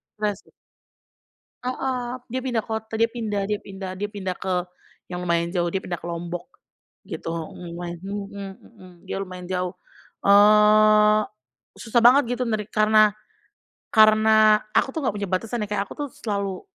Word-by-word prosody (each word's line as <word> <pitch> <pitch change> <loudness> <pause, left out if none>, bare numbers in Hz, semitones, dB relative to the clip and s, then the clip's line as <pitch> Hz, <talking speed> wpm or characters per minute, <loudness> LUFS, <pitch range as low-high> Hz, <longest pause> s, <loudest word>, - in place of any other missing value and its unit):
stres 210 -2 -1
sih. - - -24 1.1
Heeh, 255 -1 -3
dia 255 +3 -3
pindah 240 -5 -1
kota, 220 0 -5
dia 230 - +4
pindah 220 -4 -3
dia 210 -1 0
pindah 195 -1 -7
dia 205 +2 -3
pindah 190 -3 -4
ke 180 -2 -2 0.4
yang 180 0 -5
lumayan 170 -1 +1
jauh, 175 -1 +1
dia 190 - -2
pindah 175 -2 -4
ke - - -9
Lombok, 175 +1 -5 0.6
gitu. - - -5
Mhm, 170 +1 -7
wen 175 -1 -5
mhm 200 0 -6
mhm, 185 -5 -16 0.2
dia - - -3
lumayan 185 -1 -8
jauh. 180 -1 -2 0.5
Eee, 210 +1 +6 0.6
susah 235 +1 +1
banget 245 0 +5
gitu - - -1
nerik 215 -2 -2
karena 215 0 +5 0.8
karena 215 0 +6 0.2
aku - - +3
tuh 320 - -3
nggak 215 - 0
punya 200 -1 -3
batasan 220 +5 -2
ya, - - -6
kayak 205 -1 0
aku - - -9
tuh - - -11
selalu 200 -3 -3
210 Hz, 160 wpm, -24 LUFS, 185-220 Hz, 1.1 s, Eee